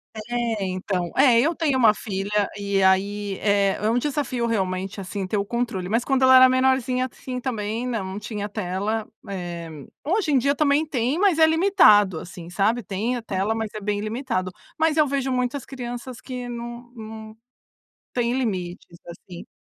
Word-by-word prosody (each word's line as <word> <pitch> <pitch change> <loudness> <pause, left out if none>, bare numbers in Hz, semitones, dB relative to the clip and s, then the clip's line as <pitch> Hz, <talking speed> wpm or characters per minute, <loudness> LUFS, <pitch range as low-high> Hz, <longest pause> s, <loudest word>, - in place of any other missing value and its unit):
É, 230 -1 -2
então. 185 -1 -2
É, 255 -4 +6
eu 320 +6 +2
tenho 295 -5 +1
uma 225 -4 +6
filha, 205 -1 -2
e 200 -1 0
aí 195 +1 +1
é 200 -1 +2
é 210 - 0
um 230 - +2
desafio 260 -4 -1
realmente, 190 -2 -2
assim, 190 0 -4
ter 205 - -1
o 200 - 0
controle. 225 -5 -2
Mas 230 +3 +1
quando 265 0 +1
ela 260 0 +7
era 255 0 +9
menorzinha, 255 -1 +2
assim, 255 -1 -6
também, 225 -2 -3
não, 230 -5 -2
não 200 - -5
tinha 210 -1 -5
tela. 205 +2 -2 0.2
Eh, 175 -3 -5 0.4
hoje 360 -1 +1
em 275 - +4
dia 280 +3 +2
também 295 +1 +2
tem, 270 +1 -1
mas 380 -5 +3
é 320 - +8
limitado, 315 - +5
assim, 170 0 -10
sabe, 210 +6 +1
tem 210 +6 -2
a 240 - -4
tela, 200 -1 -1
mas 225 -1 -3
é 215 - -5
bem 205 0 -1
limitado. 215 -4 -2 0.3
Mas 320 -1 +2
eu 305 -1 +4
vejo 270 -1 -1
muitas 250 +1 -1
crianças 245 -1 -7
que 250 -2 -6
não 240 0 -7
não 220 -1 -9 0.8
têm 240 -1 0
limites, 185 -9 -3
assim. 175 +1 -10
225 Hz, 180 wpm, -23 LUFS, 200-255 Hz, 0.8 s, era